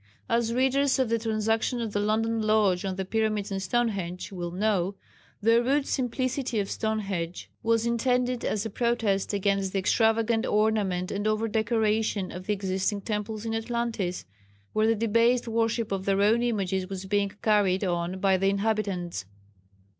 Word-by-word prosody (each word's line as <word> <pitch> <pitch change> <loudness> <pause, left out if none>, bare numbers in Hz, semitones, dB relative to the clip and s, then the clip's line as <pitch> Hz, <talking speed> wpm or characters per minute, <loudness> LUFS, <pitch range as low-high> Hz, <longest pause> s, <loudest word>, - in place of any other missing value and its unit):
As 230 0 +1
readers 265 +2 +2
of 260 -3 +1
the 230 0 +1
Transaction 225 +2 0
of 225 -3 -3
the 205 - +1
London 220 +2 +1
Lodge 210 -4 +2
on 190 -1 -2
the 190 0 -3
"Pyramids 215 0 -1
and 195 0 -2
Stonehenge," 195 -4 -1
will 175 -2 -4
know, 195 0 0 0.5
the 230 +2 +5
rude 275 +3 +1
simplicity 255 -1 -1
of 200 - -2
Stonehenge 195 -6 -3
was 230 0 +2
intended 250 +1 +1
as 215 +1 -1
a 225 - -4
protest 230 -4 0
against 195 -1 0
the - - 0
extravagant 225 +3 +2
ornament 210 -4 +1
and 205 +1 -2
over 215 +1 +1
decoration 220 -2 0
of 185 +1 -8
the 210 - +2
existing 195 +1 -1
temples 210 +1 -4
in 225 - -2
Atlantis, 225 -5 -2 0.5
where 215 +1 +2
the 225 - +3
debased 230 +3 +2
worship 230 -1 0
of 195 -1 -2
their 195 0 +2
own 225 +3 +4
images 195 -5 -1
was 190 -1 -5
being 200 0 0
carried 205 -3 +3
on 175 0 -1
by 190 -1 +3
the 195 +1 +2
inhabitants. 200 - -1
215 Hz, 160 wpm, -27 LUFS, 195-230 Hz, 0.5 s, the